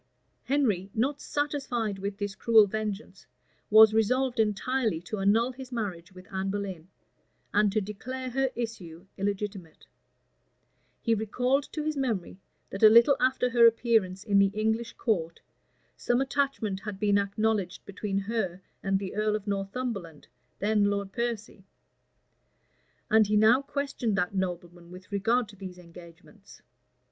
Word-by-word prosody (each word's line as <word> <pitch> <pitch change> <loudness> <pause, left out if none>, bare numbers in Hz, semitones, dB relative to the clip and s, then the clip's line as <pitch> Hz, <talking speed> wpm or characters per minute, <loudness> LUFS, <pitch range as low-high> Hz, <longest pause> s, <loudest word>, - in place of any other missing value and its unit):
Henry, 215 -10 +1
not 270 +6 0
satisfied 250 -8 -2
with 200 +1 -4
this 205 -1 -3
cruel 220 +1 +5
vengeance, 215 +1 -5 0.4
was 215 0 +8
resolved 250 +3 +1
entirely 220 -1 0
to 200 +4 -5
annul 220 +6 +3
his 260 0 -10
marriage 190 -8 -4
with 185 0 -13
Anne 190 0 -2
Boleyn, 195 -4 -4 0.7
and 210 0 +3
to 215 - +1
declare 255 +6 -6
her 270 +1 +1
issue 190 -8 -6
illegitimate: 195 -4 -4 1.2
he 230 - +1
recalled 250 +6 0
to 305 - -4
his 310 0 -2
memory, 220 -10 -2 0.3
that 195 - -6
a 215 - +9
little 235 +5 +6
after 255 -1 +1
her 235 -1 +7
appearance 220 -5 +1
in 200 -2 +3
the 200 0 +5
English 220 +2 -1
court, 170 -8 -1 0.6
some 240 0 0
attachment 270 -7 -1
had 200 -1 -7
been 205 -1 +3
acknowledged 200 -2 -1
between 200 0 -4
her 195 -3 -2 0.2
and 195 -1 +1
the 190 -1 -5
earl 215 0 0
of 210 -2 -5
Northumberland, 195 - -4 0.3
then 210 0 +2
Lord 200 -1 -1
Piercy; 230 -4 -4 1.5
and 220 -1 +5
he 210 0 +2
now 220 +5 +5
questioned 275 -7 -2
that 180 -1 0
nobleman 175 -2 -4
with 185 +2 -13
regard 225 +4 +1
to 205 - -13
these 185 -2 -9
engagements. 175 +3 -15
210 Hz, 140 wpm, -28 LUFS, 195-235 Hz, 1.5 s, a